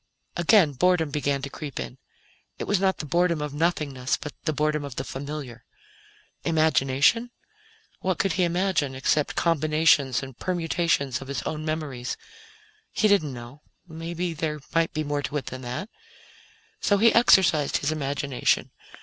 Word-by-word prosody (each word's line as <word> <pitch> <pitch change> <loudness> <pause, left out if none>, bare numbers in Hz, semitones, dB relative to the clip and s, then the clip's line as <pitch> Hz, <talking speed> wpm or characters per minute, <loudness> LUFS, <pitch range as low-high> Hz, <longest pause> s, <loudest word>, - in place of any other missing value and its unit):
Again, 175 -2 +5
boredom 160 +2 +2
began 140 -1 -1
to 140 - -4
creep 145 -4 -6
in. 130 - -6 0.6
It - - -4
was 205 -2 +1
not 190 -1 +2
the - - -5
boredom 170 +1 +1
of 150 -1 -4
nothingness, 145 -5 0
but 150 - -7
the 155 - +2
boredom 150 0 0
of 140 -3 -7
the - - -3
familiar. 135 -4 -6 0.8
Imagination? 160 - +3 0.7
What 185 -1 -1
could 195 -3 +1
he 180 +2 +1
imagine, 175 -5 0
except 140 +3 +1
combinations 155 -5 +3
and 135 -2 -8
permutations 165 -7 0
of 135 - -9
his 140 - -3
own 155 -1 -4
memories? 150 -6 -3 0.7
He 215 - +2
didn't 195 -8 +3
know 120 +3 -10 0.3
perhaps 165 0 -4
there 150 -2 -2
might 165 0 +2
be 155 -1 -2
more 145 -1 -1
to 150 - -3
it 140 - -4
than 130 - -7
that. 125 +10 -5 0.9
So 205 - +2
he 225 +3 +5
exercised 185 -10 +5
his 145 - -1
imagination. 140 -3 0
155 Hz, 155 wpm, -25 LUFS, 140-170 Hz, 0.9 s, Again